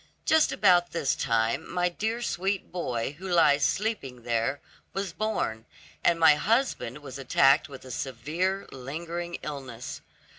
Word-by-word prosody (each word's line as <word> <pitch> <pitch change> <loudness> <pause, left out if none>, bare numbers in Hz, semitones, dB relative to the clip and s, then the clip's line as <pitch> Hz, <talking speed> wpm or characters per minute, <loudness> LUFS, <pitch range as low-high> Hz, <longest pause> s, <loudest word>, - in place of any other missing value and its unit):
Just 315 -1 +4
about 180 -3 +4
this 155 -5 +1
time, 115 +4 0
my 180 0 +1
dear 220 +7 -2
sweet 195 -2 -2
boy, 135 -5 -3
who 190 - -6
lies 145 -5 +4
sleeping 165 - -1
there, 120 +4 0 0.3
was 195 -3 -3
born, 175 - -2 0.4
and 170 -1 +3
my 160 -2 +8
husband 190 - 0
was 135 -1 -8
attacked 135 +3 +4
with 135 -2 -10
a 130 - -8
severe 155 - -2
lingering 170 +6 -5
illness. 130 -5 -6
155 Hz, 140 wpm, -27 LUFS, 130-185 Hz, 0.4 s, my